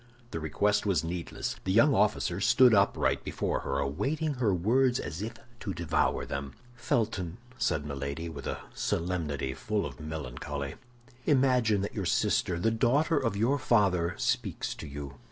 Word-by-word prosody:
The 80 Hz, -, -3 dB
request 100 Hz, +7 st, +1 dB
was 95 Hz, -5 st, +1 dB
needless. 85 Hz, +1 st, -4 dB
The 95 Hz, -, -1 dB
young 115 Hz, +8 st, +5 dB
officer 100 Hz, -4 st, +1 dB
stood 125 Hz, +4 st, +6 dB
upright 100 Hz, -1 st, +2 dB
before -, -, -1 dB
her, 70 Hz, -, -2 dB
awaiting 140 Hz, -, -1 dB
her 125 Hz, -6 st, +1 dB
words 120 Hz, +8 st, +3 dB
as 80 Hz, +5 st, -5 dB
if 110 Hz, +2 st, -4 dB, 0.3 s
to 100 Hz, -, -4 dB
devour 85 Hz, -1 st, 0 dB
them. 70 Hz, -1 st, -5 dB, 0.2 s
"Felton," 110 Hz, -7 st, -1 dB, 0.2 s
said 80 Hz, -9 st, 0 dB
Milady, 70 Hz, +3 st, -4 dB
with 75 Hz, -4 st, -7 dB
a -, -, -3 dB
solemnity 80 Hz, -6 st, -1 dB
full 105 Hz, +7 st, -2 dB
of 65 Hz, -4 st, -8 dB
melancholy, 70 Hz, -2 st, -5 dB, 0.5 s
"imagine 125 Hz, -7 st, +3 dB
that 100 Hz, -, -3 dB
your -, -, -3 dB
sister, 85 Hz, -, +1 dB
the 115 Hz, +6 st, +2 dB
daughter 140 Hz, +8 st, +2 dB
of 115 Hz, -6 st, -1 dB
your 125 Hz, +7 st, +2 dB
father, 95 Hz, -8 st, +2 dB
speaks 120 Hz, -, -1 dB
to 80 Hz, -, -8 dB
you. 70 Hz, -1 st, -7 dB
95 Hz, 155 wpm, -29 LUFS, 75-115 Hz, 0.5 s, stood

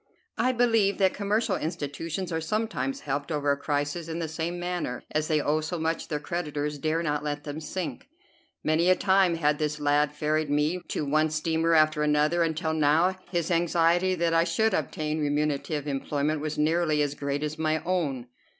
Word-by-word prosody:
I 255 Hz, -, +3 dB
believe 225 Hz, -5 st, +2 dB
that 190 Hz, -2 st, +3 dB
commercial 210 Hz, +3 st, 0 dB
institutions 160 Hz, +3 st, -4 dB
are 160 Hz, 0 st, -1 dB
sometimes 160 Hz, -, -2 dB
helped 145 Hz, +2 st, -3 dB
over 145 Hz, -2 st, +1 dB
a -, -, +2 dB
crisis 145 Hz, +3 st, -2 dB
in 165 Hz, 0 st, -4 dB
the 165 Hz, -1 st, -2 dB
same 165 Hz, +2 st, -3 dB
manner, 175 Hz, -8 st, -3 dB
as 155 Hz, 0 st, 0 dB
they 155 Hz, -1 st, +2 dB
owe 150 Hz, +2 st, +1 dB
so 160 Hz, +3 st, -3 dB
much 160 Hz, 0 st, -2 dB
their 150 Hz, -, -2 dB
creditors 150 Hz, -2 st, -3 dB
dare 155 Hz, +3 st, 0 dB
not 150 Hz, -2 st, -1 dB
let 145 Hz, -1 st, -3 dB
them 145 Hz, +1 st, -6 dB
sink. 185 Hz, -, -5 dB, 0.6 s
Many 160 Hz, +3 st, +2 dB
a 185 Hz, -, +6 dB
time 190 Hz, -2 st, +3 dB
had 150 Hz, -2 st, +1 dB
this 150 Hz, -1 st, -1 dB
lad 145 Hz, 0 st, +2 dB
ferried 150 Hz, 0 st, -1 dB
me 150 Hz, +5 st, +1 dB
to 150 Hz, -, -2 dB
one 155 Hz, +2 st, +2 dB
steamer 160 Hz, +2 st, +1 dB
after 155 Hz, -1 st, +4 dB
another, 150 Hz, +3 st, +2 dB
until 160 Hz, 0 st, 0 dB
now 160 Hz, +4 st, +3 dB
his 175 Hz, -2 st, -1 dB
anxiety 175 Hz, +2 st, +2 dB
that 170 Hz, -1 st, +1 dB
I 165 Hz, 0 st, +4 dB
should 195 Hz, +6 st, +1 dB
obtain 155 Hz, 0 st, -2 dB
remunerative 145 Hz, 0 st, -1 dB
employment 145 Hz, +2 st, -1 dB
was 155 Hz, 0 st, -3 dB
nearly 155 Hz, -1 st, +2 dB
as 145 Hz, -1 st, -1 dB
great 140 Hz, 0 st, -3 dB
as 155 Hz, +1 st, -4 dB
my 155 Hz, 0 st, 0 dB
own. 155 Hz, -9 st, -1 dB
155 Hz, 185 wpm, -27 LUFS, 150-170 Hz, 0.6 s, a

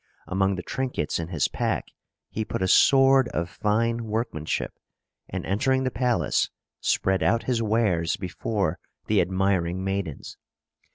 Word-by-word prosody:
Among 95 Hz, +1 st, +1 dB
the 90 Hz, -, -5 dB
trinkets 130 Hz, -, -2 dB
in 80 Hz, -, -3 dB
his 85 Hz, -5 st, 0 dB
pack, -, -, -2 dB, 0.4 s
he 110 Hz, -, -2 dB
put 95 Hz, -, -3 dB
a -, -, +2 dB
sword 135 Hz, +4 st, +6 dB
of 85 Hz, +1 st, -2 dB
fine 115 Hz, +6 st, 0 dB
workmanship, 105 Hz, -8 st, -2 dB, 0.6 s
and, -, -, -4 dB
entering 130 Hz, +7 st, +1 dB
the 130 Hz, -, 0 dB
palace, 120 Hz, +1 st, +1 dB, 0.3 s
spread 95 Hz, 0 st, +1 dB
out 115 Hz, +3 st, +2 dB
his 120 Hz, -1 st, 0 dB
wares 105 Hz, -7 st, +1 dB
before 95 Hz, -1 st, -2 dB, 0.3 s
the -, -, +3 dB
admiring 95 Hz, -1 st, 0 dB
maidens. 95 Hz, -6 st, -4 dB
100 Hz, 135 wpm, -25 LUFS, 90-115 Hz, 0.6 s, sword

